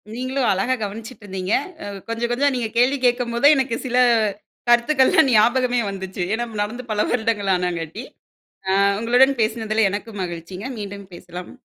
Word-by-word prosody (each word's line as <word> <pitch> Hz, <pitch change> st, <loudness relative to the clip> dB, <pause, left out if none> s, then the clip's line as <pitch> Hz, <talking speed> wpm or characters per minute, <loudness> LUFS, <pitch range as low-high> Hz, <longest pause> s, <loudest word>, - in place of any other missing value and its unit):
நீங்களும் 255 Hz, +1 st, -1 dB
அழகா 195 Hz, +7 st, +1 dB
கவனிச்சுட்டு 225 Hz, +3 st, -7 dB
இருந்தீங்க. 190 Hz, +1 st, -3 dB, 0.3 s
அ -, -, -6 dB, 0.2 s
கொஞ்சம் 230 Hz, +1 st, -2 dB
கொஞ்சம் 280 Hz, +3 st, +2 dB
நீங்க 235 Hz, -3 st, -2 dB
கேள்வி 255 Hz, +4 st, +3 dB
கேட்கும்போதுதான், 245 Hz, +4 st, +3 dB
எனக்கு 265 Hz, -3 st, 0 dB
சில 250 Hz, 0 st, -1 dB, 0.7 s
கருத்துக்கள்லாம் 265 Hz, +4 st, +4 dB
ஞாபகமே 245 Hz, +2 st, +3 dB
வந்துச்சு. 190 Hz, -2 st, -5 dB
ஏன்னா 240 Hz, +1 st, -2 dB, 0.2 s
நடந்து 235 Hz, +5 st, -4 dB
பல 210 Hz, 0 st, +1 dB
வருடங்கள் 220 Hz, -4 st, 0 dB
ஆனங்காட்டி, 180 Hz, +3 st, -3 dB, 0.7 s
அ -, -, +3 dB, 0.3 s
உங்களுடன் 250 Hz, +4 st, +3 dB
பேசினதுல 220 Hz, -1 st, +1 dB
எனக்கும் 205 Hz, +1 st, -6 dB
மகிழ்ச்சிங்க. 175 Hz, +6 st, -7 dB
மீண்டும் 200 Hz, -2 st, -8 dB
பேசலாம். 175 Hz, +1 st, -9 dB
230 Hz, 140 wpm, -21 LUFS, 195-250 Hz, 0.7 s, கருத்துக்கள்லாம்